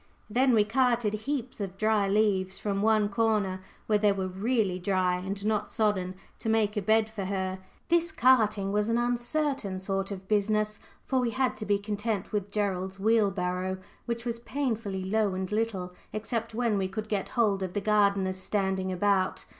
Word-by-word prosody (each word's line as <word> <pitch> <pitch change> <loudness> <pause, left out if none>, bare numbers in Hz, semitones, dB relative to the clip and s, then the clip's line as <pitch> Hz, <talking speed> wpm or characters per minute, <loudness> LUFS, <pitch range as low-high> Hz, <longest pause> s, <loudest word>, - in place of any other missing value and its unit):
Then 255 +2 +4
we 215 - +5
"carted" 235 -1 +2
heaps 250 +1 -3
of 195 -1 -5
dry 215 -1 +2
leaves 195 -2 +1
from 200 -1 -2
one 215 -1 +3
corner, 205 -3 0 0.2
where 210 -1 +2
they 205 0 +4
were 190 -1 -1
really 195 0 0
dry 185 -1 +1
and 195 +2 -5
not 215 -1 0
sodden, 190 -4 0 0.2
to 225 - -3
make 220 -2 +2
a 210 - 0
bed 220 +2 +3
for 215 -3 -5
her. 190 -1 -2 0.3
This 340 -1 +2
carting 215 -8 +3
was 210 +2 +1
an 230 - +2
uncertain 245 -2 -1
sort 195 +1 -2
of 190 -1 -7
business, 215 0 +1 0.3
for 265 - +1
we 245 -2 +1
had 260 +3 0
to 215 - -6
be 205 0 +3
content 205 0 -3
with 205 -2 -2
Gerald's 195 -2 -2
wheelbarrow, 190 -4 +1 0.3
which 235 0 -3
was 235 -1 -2
painfully 230 -7 -2
low 205 0 +1
and 185 +1 -3
little, 210 -5 -1 0.2
except 225 +1 -3
when 230 -4 +1
we 190 - 0
could 210 +3 -5
get 205 -3 -2
hold 205 -4 +3
of 185 -1 -3
the 205 - 0
gardener's 200 -2 +2
standing 190 -1 -1
about. 190 +1 +1
210 Hz, 180 wpm, -28 LUFS, 190-225 Hz, 0.3 s, we